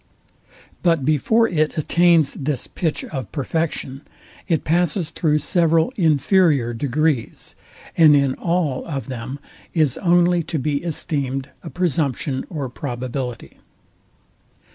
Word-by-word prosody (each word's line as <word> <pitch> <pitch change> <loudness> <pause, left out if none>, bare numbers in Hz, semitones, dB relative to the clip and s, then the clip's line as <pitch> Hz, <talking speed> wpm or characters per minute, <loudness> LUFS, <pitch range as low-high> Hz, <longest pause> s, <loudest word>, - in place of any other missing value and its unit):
But 165 -6 +2
before 220 - +3
it 155 -4 0
attains 170 -1 +3
this 140 -2 -3
pitch 160 -4 -2
of 135 -4 -6
perfection, 145 -2 -3 0.5
it 165 -4 0
passes 170 0 0
through 155 -2 +1
several 165 - +2
inferior 155 - +3
degrees, 145 +1 -1 0.4
and 155 -3 +7
in 140 -2 +2
all 165 -6 -1
of 135 -6 -5
them 130 +2 -5 0.4
is 155 -6 +1
only 175 -1 +3
to 165 0 -4
be 145 +1 -1
esteemed 140 -5 -3
a 165 - -8
presumption 145 -6 -1
or 150 -6 -4
probability. 125 -1 -5
150 Hz, 115 wpm, -21 LUFS, 135-170 Hz, 0.5 s, and